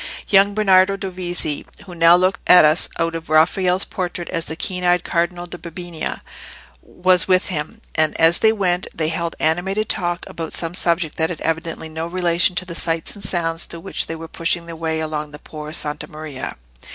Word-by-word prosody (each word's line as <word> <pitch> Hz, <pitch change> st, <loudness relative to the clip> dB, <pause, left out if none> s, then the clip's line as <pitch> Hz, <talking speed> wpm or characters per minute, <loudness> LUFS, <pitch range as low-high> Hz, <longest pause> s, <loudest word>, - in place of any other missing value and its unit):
Young 200 Hz, 0 st, +5 dB
Bernardo 195 Hz, -2 st, +4 dB
Dovizi, 180 Hz, -5 st, -3 dB, 0.2 s
who 185 Hz, -, -10 dB
now 165 Hz, 0 st, +6 dB
looks 185 Hz, +2 st, +2 dB
at 180 Hz, -3 st, +8 dB
us 155 Hz, +2 st, +3 dB
out 165 Hz, 0 st, 0 dB
of 165 Hz, -1 st, -6 dB
Raphael's 180 Hz, +4 st, +3 dB
portrait 175 Hz, -2 st, -4 dB
as 165 Hz, -2 st, -2 dB
the 160 Hz, -, -2 dB
keen 180 Hz, +2 st, -2 dB
eyed 180 Hz, 0 st, +3 dB
Cardinal 175 Hz, +1 st, -1 dB
da 175 Hz, 0 st, -8 dB
Bibbiena, 170 Hz, -1 st, -6 dB, 0.6 s
was 180 Hz, -1 st, +2 dB
with 185 Hz, +1 st, +2 dB
him; 180 Hz, +6 st, -4 dB
and, 155 Hz, -1 st, +1 dB
as 165 Hz, +1 st, +5 dB
they 220 Hz, -, +5 dB
went, 185 Hz, -4 st, 0 dB
they 155 Hz, -1 st, 0 dB
held 165 Hz, 0 st, -3 dB
animated 190 Hz, +7 st, 0 dB
talk 175 Hz, -3 st, -2 dB
about 165 Hz, -1 st, -6 dB
some 165 Hz, 0 st, -1 dB
subject 170 Hz, -3 st, +1 dB
that 160 Hz, 0 st, +1 dB
had 175 Hz, -, -6 dB
evidently 165 Hz, 0 st, -2 dB
no 160 Hz, +1 st, -5 dB
relation 175 Hz, 0 st, +1 dB
to 185 Hz, -, 0 dB
the 175 Hz, -, -7 dB
sights 165 Hz, -1 st, -2 dB
and 205 Hz, -, -11 dB
sounds 165 Hz, -1 st, 0 dB
through 170 Hz, -, -9 dB
which -, -, -2 dB
they 165 Hz, -, -4 dB
were 165 Hz, 0 st, -8 dB
pushing 165 Hz, +1 st, -1 dB
their 170 Hz, -1 st, -8 dB
way 160 Hz, -1 st, -2 dB
along 155 Hz, -1 st, -3 dB
the 150 Hz, -, -10 dB
Por' 150 Hz, 0 st, -9 dB
Santa 150 Hz, -2 st, -1 dB
Maria. 150 Hz, -3 st, -6 dB
170 Hz, 195 wpm, -20 LUFS, 160-180 Hz, 0.6 s, at